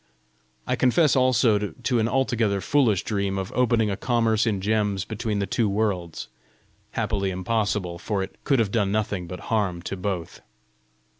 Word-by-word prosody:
I - - 0
confess 130 +3 +3
also 125 -4 +4
to 120 +4 -1
an 110 - +2
altogether 115 -5 +1
foolish 110 -1 +2
dream 100 -2 -1
of 95 -1 -4
opening 115 -4 +2
a - - -1
commerce 115 0 +1
in 105 -3 0
gems 105 -1 0
between 110 0 -3
the 100 - 0
two 110 +1 0
worlds 100 -5 -2 0.7
happily 105 -3 -1
impossible, 95 -2 -1
for 100 +1 -2
it - - -10
could 135 - +2
have 110 -4 +1
done 100 -3 +1
nothing 100 -4 -1
but 90 +1 -7
harm 95 -6 0
to 95 - -4
both. 90 -3 -4
105 Hz, 160 wpm, -25 LUFS, 95-115 Hz, 0.7 s, also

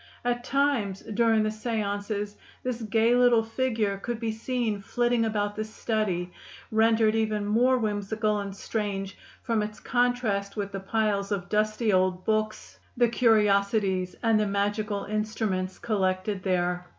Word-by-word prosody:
At 240 0 0
times, 260 -8 0
during 225 0 +2
the 215 - +1
séances, 210 -2 -3 0.3
this 250 -2 -3
gay 225 +2 +2
little 245 -2 +5
figure 225 -4 -1
could 235 +2 -4
be 230 -1 -1
seen 225 -2 -2
flitting 240 +3 +1
about 205 -1 -1
the 215 - -2
study, 215 -5 -2 0.4
rendered 220 0 +4
even 215 -2 0
more 245 +5 +3
whimsical 210 -1 -1
and 200 -1 -5
strange 200 -2 -3 0.3
from 230 -3 +1
its 210 0 -5
contrast 240 -5 0
with 200 -1 -3
the 195 - -4
piles 200 0 0
of 190 -3 -2
dusty 215 +1 +1
old 185 0 +1
books, 215 0 -2 0.2
the 240 -1 +4
curiosities, 200 -5 +2
and 225 -2 +4
the 210 - +1
magical 205 +1 -1
instruments 210 -3 -2
collected 195 -3 -1
there. 180 -1 0
215 Hz, 140 wpm, -27 LUFS, 200-225 Hz, 0.4 s, little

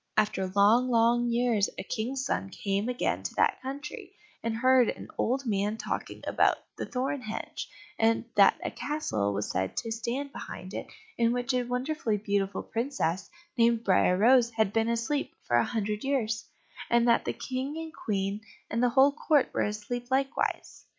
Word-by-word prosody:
After 190 -3 +1
long, 225 +6 +5
long 240 0 +3
years 235 -3 +2
a - - -4
King's 260 +4 -3
son 195 - -1
came 200 +3 -2
again 250 - -1
to - - -5
that - - +2
country, 275 +3 -7 0.3
and 230 -1 -2
heard 255 0 +5
an - - -6
old 265 +3 0
man 210 -1 0
talking - - -4
about - - +3 0.2
the - - -5
thorn 265 +1 -2
hedge, 220 -2 -5 0.3
and 225 +1 +3
that 200 -1 +5
a - - -1
castle 110 - -2
was 100 +1 -2
said 95 +1 -2
to 225 - -2
stand 240 +6 -3
behind 185 -6 -8
it - - -5 0.3
in 230 0 +4
which 245 +2 -1
a 250 - +2
wonderfully 250 -1 -1
beautiful 200 -1 -1
princess, 210 - -2 0.3
named 230 0 +4
Briar 180 -2 +3
rose, 240 +3 +5
had 220 -3 0
been 225 0 +2
asleep 235 +5 -1
for 120 - +2
a 120 - +4
hundred 210 -1 -2
years; 225 -6 -1 0.4
and 235 0 +4
that 235 - +4
the - - -1
King 265 +4 -4
and 325 0 -6
Queen 200 -3 -2 0.3
and 230 - 0
the 250 - +4
whole 270 +3 +5
court 295 -1 +2
were - - 0
asleep 215 +4 -3
likewise. 270 +1 -1
230 Hz, 175 wpm, -29 LUFS, 210-255 Hz, 0.4 s, long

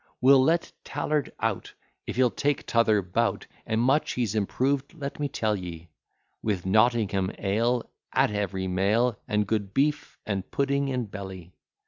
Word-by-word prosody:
We'll 135 +1 +7
let 165 +4 +1
Tallard 150 -1 -1
out, - - -2 0.3
If - - -4
he'll 125 -1 +3
take 145 0 -1
t'other 110 -3 +3
bout; 90 0 0 0.2
And 110 - 0
much 135 +6 +2
he's 120 -5 -1
improved, 135 - 0
let 140 -3 -6
me 145 - 0
tell 110 -5 0
ye, 85 -3 -7 0.5
With 100 -5 -1
Nottingham 105 -2 +2
ale 115 +5 0 0.2
At - - +3
every 100 -2 -2
meal, 105 +6 +1
And 105 0 +1
good 100 -2 -2
beef 145 +2 0
and 100 -3 -3
pudding 140 0 0
in 125 -3 -1
belly. 95 -4 -8
110 Hz, 150 wpm, -27 LUFS, 100-135 Hz, 0.5 s, We'll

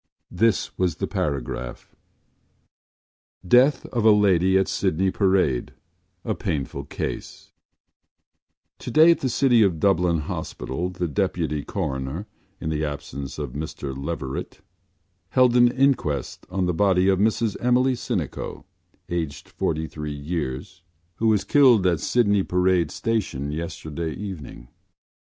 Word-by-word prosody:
This 115 -2 +1
was 90 -3 +1
the - - -2
paragraph: 65 -3 -4 1.5
DEATH 130 +7 +4
OF 120 -3 -2
A 110 - +7
LADY 95 -3 +4
AT 95 - +2
SYDNEY 95 +4 0
PARADE 95 - +1 0.5
A - - 0
PAINFUL 70 -4 -3
CASE - - -6 1.3
Today 160 +2 +5
at 170 - +2
the 130 - -1
City 125 -2 +4
of 95 -6 +2
Dublin 90 -3 +2
Hospital 80 +3 -4
the 90 -1 -3
Deputy 75 0 -1
Coroner 65 +8 -3 0.3
(in 80 - -3
the 75 0 -1
absence 70 -2 -5
of 75 -4 -4
Mr 70 -1 -5
Leverett) 70 -1 -5 0.7
held 125 -2 +4
an 120 0 +7
inquest 125 - 0
on 95 0 -1
the 90 - 0
body 95 +1 +3
of 95 -1 +3
Mrs 110 0 +1
Emily 125 +2 +3
Sinico, 115 - -4 0.4
aged 85 -4 -4
forty 80 0 -2
three 75 -1 -6
years, 75 +2 -4 0.4
who 115 - +1
was 105 -3 +3
killed 125 -9 +5
at 85 -4 +2
Sydney 105 -2 +2
Parade 90 -3 +2
Station 90 - -2
yesterday 80 0 -5
evening. 80 -11 -8
90 Hz, 125 wpm, -24 LUFS, 75-105 Hz, 1.5 s, A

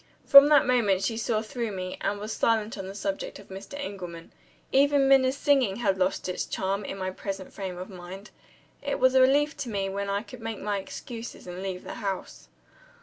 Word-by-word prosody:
From 280 +1 +10
that 295 -2 +6
moment 210 -7 +2
she 225 +3 0
saw 220 -1 -1
through 230 0 -4
me, 185 -1 -5
and 205 - -1
was 215 +2 -4
silent 225 -1 +1
on 195 -2 -6
the 195 - -8
subject 195 -1 -4
of 200 - -15
Mr. 195 +8 -9
Engelman. 180 -11 -7 0.4
Even 280 0 +4
Minna's 270 0 +4
singing 270 -9 +3
had 195 -5 0
lost 185 0 0
its 180 - -3
charm, 195 +2 -2
in 195 - -5
my 185 -1 -3
present 190 0 -6
frame 190 -3 -5
of 185 +1 -6
mind. 190 +2 -10 0.5
It - - -2
was 260 0 +4
a 260 - +6
relief 290 +4 +4
to 280 -4 -4
me 195 -2 -1
when 200 +1 -3
I 200 +1 -1
could 250 -1 -12
make 225 -1 -5
my 205 -1 -1
excuses, 235 0 -8
and 180 0 -7
leave 190 -1 -4
the - - -7
house. 195 -2 -5
205 Hz, 205 wpm, -27 LUFS, 190-255 Hz, 0.5 s, From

